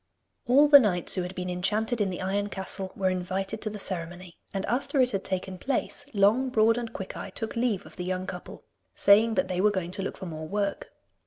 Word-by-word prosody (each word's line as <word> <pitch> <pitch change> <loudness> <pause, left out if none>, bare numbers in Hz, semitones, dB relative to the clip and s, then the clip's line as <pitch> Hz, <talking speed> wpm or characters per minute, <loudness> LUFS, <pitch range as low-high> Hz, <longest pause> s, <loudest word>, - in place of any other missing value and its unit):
All 280 +5 +6
the 290 -1 +10
knights 185 -8 0
who 185 - +1
had 180 +1 -5
been 180 0 -4
enchanted 210 +6 0
in 200 - +1
the 185 0 -4
Iron 200 +2 -1
Castle 190 -1 -3
were 190 -1 +1
invited 190 +3 -3
to 215 - -2
the 210 - -6
ceremony, 175 -2 -5 0.2
and 195 0 -3
after 265 +4 -1
it 255 -1 +4
had 195 -3 -2
taken 185 0 -4
place, 275 +3 -2
Long, 220 +6 +3
Broad, 225 -1 +4
and 235 -2 -5
Quickeye 190 -1 -6
took 225 - -4
leave 230 -5 0
of - - -14
the 180 - -3
young 185 0 -2
couple, 180 -1 -8 0.3
saying 220 +3 +5
that 275 - +1
they 180 0 -1
were 210 - +5
going 185 -4 -3
to 195 - -4
look 195 - -4
for 190 - -7
more 155 -2 -6
work. 200 +1 -2
195 Hz, 225 wpm, -27 LUFS, 185-225 Hz, 0.3 s, the